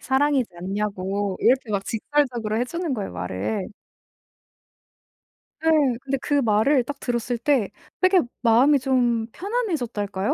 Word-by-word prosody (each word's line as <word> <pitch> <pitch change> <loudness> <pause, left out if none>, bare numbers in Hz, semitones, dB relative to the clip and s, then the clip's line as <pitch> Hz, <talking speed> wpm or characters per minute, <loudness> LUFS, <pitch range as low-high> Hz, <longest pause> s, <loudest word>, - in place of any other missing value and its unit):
사랑이지 270 -1 +1
않냐고 195 +1 -2
이렇게 255 -1 +2
막 200 -1 0
직설적으로 235 -3 -1
해 245 - +1
주는 335 0 -3
거예요 205 -5 -4
말을. 95 - -3 1.9
네. 320 - +2 0.3
근데 275 0 -2
그 290 - 0
말을 235 +4 +3
딱 280 +2 -7
들었을 240 0 -2
때 240 -4 +1 0.3
되게 370 0 +5 0.2
마음이 255 +5 +5
좀 245 -3 +1
편안해졌달까요? 250 - -2
240 Hz, 280 characters per minute, -23 LUFS, 210-280 Hz, 1.9 s, 되게